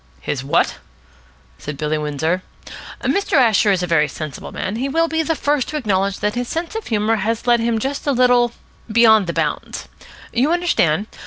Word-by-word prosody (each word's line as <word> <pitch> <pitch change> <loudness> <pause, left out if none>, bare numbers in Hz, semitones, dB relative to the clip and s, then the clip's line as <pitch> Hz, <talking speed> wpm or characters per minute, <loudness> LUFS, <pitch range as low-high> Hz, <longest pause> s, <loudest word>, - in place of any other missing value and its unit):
"His 130 - -3
what?" 140 - +1 0.8
said 150 -1 -6
Billy 155 +1 -1
Windsor. 150 +4 -1 0.6
"Mr. 400 0 0
Asher 225 - +4
is 185 -2 +1
a - - +1
very 165 -3 +2
sensible 150 0 -7
man, - - -3
and 210 - -4
he 270 +2 -1
will 330 +4 +2
be 320 0 0
the 325 0 0
first 290 -3 0
to 305 - -3
acknowledge 200 -6 0
that 210 0 0
his 245 0 -3
sense 330 - -4
of 445 -1 -5
humour 220 0 +1
has 225 +3 -2
led 240 -1 +4
him 230 0 0
just 270 +6 -3
a - - +4
little 245 -2 +3 0.4
beyond 220 -3 +5
the 170 - -2
bounds. - - -3 0.5
You 260 +7 +2
understand? 215 - +1
225 Hz, 190 wpm, -19 LUFS, 180-275 Hz, 0.8 s, beyond